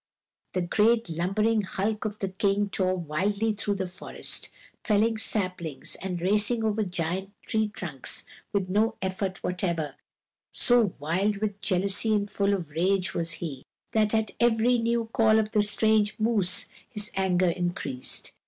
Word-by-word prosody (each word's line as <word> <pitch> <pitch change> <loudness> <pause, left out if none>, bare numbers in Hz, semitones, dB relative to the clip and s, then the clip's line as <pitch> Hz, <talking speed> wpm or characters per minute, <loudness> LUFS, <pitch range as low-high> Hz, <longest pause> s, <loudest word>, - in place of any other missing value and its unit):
The 185 - 0
great 220 +2 +2
lumbering 210 +7 +1
hulk 210 +2 -2
of 210 0 -3
the 195 - -3
King 200 +1 0
tore 185 -1 0
wildly 200 +7 0
through 205 0 -2
the 190 -1 -2
forest, 180 +2 -3 0.3
felling 220 +1 +2
saplings, 185 -10 -1
and 180 -2 -3
racing 210 +5 +3
over 220 0 +1
giant 180 0 -2 0.2
tree 220 -2 +1
trunks 170 - -3 0.3
with 195 -2 0
no 210 +4 +1
effort 190 0 -3
whatever, 170 -5 -2 0.6
so 240 -6 +3
wild 185 +8 0
with 205 -1 -3
jealousy 200 +3 +2
and 205 -1 0
full 200 0 +1
of 170 -6 -6
rage 185 +4 +1
was 170 -1 -1
he, 150 -6 -6 0.3
and 215 -1 +2
at 220 0 0
every 240 +1 +3
new 230 0 0
call 220 -1 +4
of 215 -1 0
the 215 -2 +3
strange 210 0 +2
moose 205 -5 +2 0.2
his 210 -4 +1
anger 185 -2 +2
increased. 175 -7 -2
200 Hz, 150 wpm, -27 LUFS, 180-215 Hz, 0.6 s, call